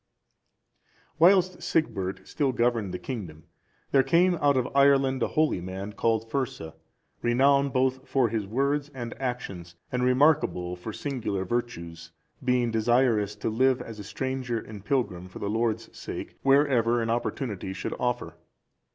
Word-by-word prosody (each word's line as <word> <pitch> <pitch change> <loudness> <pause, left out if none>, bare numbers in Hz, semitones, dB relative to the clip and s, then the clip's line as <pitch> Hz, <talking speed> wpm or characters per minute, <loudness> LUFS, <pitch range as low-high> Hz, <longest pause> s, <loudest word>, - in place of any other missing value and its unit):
] - - -38
Whilst 185 +1 +5
Sigbert 125 - -1
still 140 -3 0
governed 120 -5 +1
the 90 - -3
kingdom, 90 - -7 0.5
there 135 - +6
came 170 +7 +3
out 140 -2 +4
of 125 - +1
Ireland 135 -2 +4
a - - +2
holy 155 - +1
man 95 +3 -6
called 115 +1 0
Fursa,(379) 125 - -3 0.5
renowned 140 +3 +3
both 130 +1 0
for 130 -4 +2
his 105 -2 -2
words 140 +6 0
and 120 -2 -5
actions, 100 -9 -4 0.2
and 125 0 0
remarkable 125 - +2
for 90 +5 -7
singular 105 -7 -3
virtues, 85 -7 -4 0.3
being 125 -2 +2
desirous 110 -2 +2
to 105 - -3
live 130 +3 +3
as 115 -3 -8
a - - -6
stranger 125 +3 -3
and 105 -2 -8
pilgrim 100 -8 -1
for - - -10
the 100 - -3
Lord's 115 0 -1
sake, - - -7
wherever 135 -4 +3
an 115 -1 -1
opportunity 115 -4 -3
should 95 - -4
offer. 125 -1 -2
120 Hz, 150 wpm, -27 LUFS, 105-135 Hz, 0.5 s, there